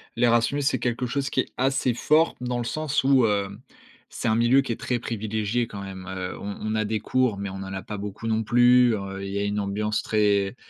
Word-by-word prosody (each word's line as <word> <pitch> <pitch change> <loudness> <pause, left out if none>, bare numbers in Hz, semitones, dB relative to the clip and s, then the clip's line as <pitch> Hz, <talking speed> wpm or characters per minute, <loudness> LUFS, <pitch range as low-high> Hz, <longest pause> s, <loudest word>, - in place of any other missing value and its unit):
L'Erasmus, 120 +4 +2
c'est 140 - +1
quelque 125 0 -1
chose 135 +2 -2
qui - - 0
est - - -10
assez 130 -1 +1
fort, 155 +6 +3
dans 125 0 -2
le - - -1
sens 150 +3 -1
où, 135 -2 +4
hem, 100 +1 -2 0.5
c'est - - -4
un 110 - +3
milieu 120 +4 +4
qui 135 - -4
est - - -5
très 125 -2 -1
privilégié 110 +1 -2
quand 100 -2 -8
même, 95 -1 -8
heu 95 -1 -5
on 100 0 -5
on 110 0 -2
a 110 0 0
des 110 0 -1
cours, 125 -2 +1
mais 100 0 -4
on 95 - -7
en 95 0 -6
a 95 - -4
pas 105 - -7
beaucoup 105 +2 -6
non 110 0 +1
plus. 120 +1 +5
Heu, 100 -1 -6
il 100 - -5
y 100 - -1
a - - 0
une 100 +1 -1
ambiance 105 +2 -1
très 105 -1 +1
110 Hz, 240 wpm, -25 LUFS, 100-125 Hz, 0.5 s, plus